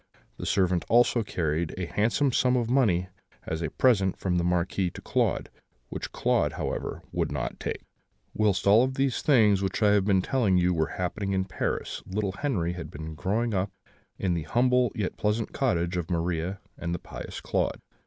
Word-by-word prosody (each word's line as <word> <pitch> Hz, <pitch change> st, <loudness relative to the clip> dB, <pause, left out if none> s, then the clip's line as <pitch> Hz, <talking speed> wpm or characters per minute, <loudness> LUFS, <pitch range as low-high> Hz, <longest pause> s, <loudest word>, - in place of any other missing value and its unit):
The -, -, -5 dB
servant 90 Hz, -3 st, +2 dB
also 120 Hz, 0 st, +4 dB
carried 80 Hz, -5 st, -2 dB
a 90 Hz, -, -2 dB
handsome 115 Hz, -, +1 dB
sum 125 Hz, +1 st, +3 dB
of 120 Hz, -1 st, -1 dB
money 95 Hz, -9 st, +2 dB, 0.4 s
as 80 Hz, +1 st, -3 dB
a 80 Hz, -, -1 dB
present 100 Hz, -8 st, +2 dB
from 90 Hz, -2 st, 0 dB
the -, -, 0 dB
Marquis 90 Hz, +1 st, +1 dB
to -, -, -10 dB
Claude; -, -, 0 dB, 0.4 s
which -, -, -5 dB
Claude, -, -, +1 dB
however, -, -, -4 dB
would -, -, -1 dB
not -, -, -3 dB
take. -, -, -4 dB, 0.5 s
"Whilst 105 Hz, -3 st, +1 dB
all 110 Hz, +6 st, +6 dB
these 135 Hz, 0 st, 0 dB
things 110 Hz, -9 st, +4 dB
of 100 Hz, -, -1 dB
which 95 Hz, -, -1 dB
I 105 Hz, -, +5 dB
have 100 Hz, -2 st, +3 dB
been 95 Hz, -3 st, +3 dB
telling 110 Hz, -9 st, +2 dB
you 90 Hz, 0 st, +3 dB
were 80 Hz, -2 st, -1 dB
happening 95 Hz, +2 st, -2 dB
at 95 Hz, 0 st, -1 dB
Paris, 95 Hz, -, -3 dB
little 100 Hz, +1 st, -1 dB
Henri 95 Hz, -, 0 dB
had 90 Hz, -2 st, -7 dB
been 80 Hz, +2 st, -7 dB
growing 105 Hz, +8 st, -1 dB
up 95 Hz, +1 st, 0 dB, 0.5 s
in 95 Hz, -2 st, 0 dB
the 85 Hz, -, -1 dB
humble 125 Hz, +7 st, +2 dB
yet 100 Hz, -4 st, -2 dB
pleasant 105 Hz, +1 st, -1 dB
cottage 90 Hz, -9 st, 0 dB
of 85 Hz, -2 st, -3 dB
Maria 85 Hz, +2 st, -1 dB, 0.2 s
and 85 Hz, 0 st, -2 dB
the -, -, -2 dB
pious -, -, -8 dB
Claude. -, -, -1 dB
95 Hz, 185 wpm, -27 LUFS, 90-115 Hz, 0.5 s, all